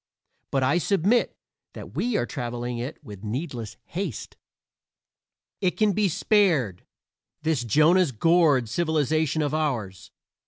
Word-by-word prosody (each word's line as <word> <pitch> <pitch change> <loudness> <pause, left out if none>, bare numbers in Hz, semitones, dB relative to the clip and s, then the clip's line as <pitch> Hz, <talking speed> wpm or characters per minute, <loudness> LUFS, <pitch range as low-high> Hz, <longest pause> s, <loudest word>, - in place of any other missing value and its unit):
But 135 -1 0
I 140 +7 +3
submit 200 +6 +1 0.4
that - - -10
we 240 -2 0
are - - 0
traveling 120 -2 -4
it 130 +6 -5
with 105 -2 -11
needless 120 -1 -5
haste. 175 - -5 1.3
It 180 -2 0
can 215 -1 +3
be 205 0 +1
spared 160 - +1 0.6
this 155 -6 0
Jonah's 155 - +4
gourd 150 -1 +3
civilization 155 +2 0
of 145 0 -2
ours. 120 - -2
150 Hz, 120 wpm, -25 LUFS, 120-175 Hz, 1.3 s, Jonah's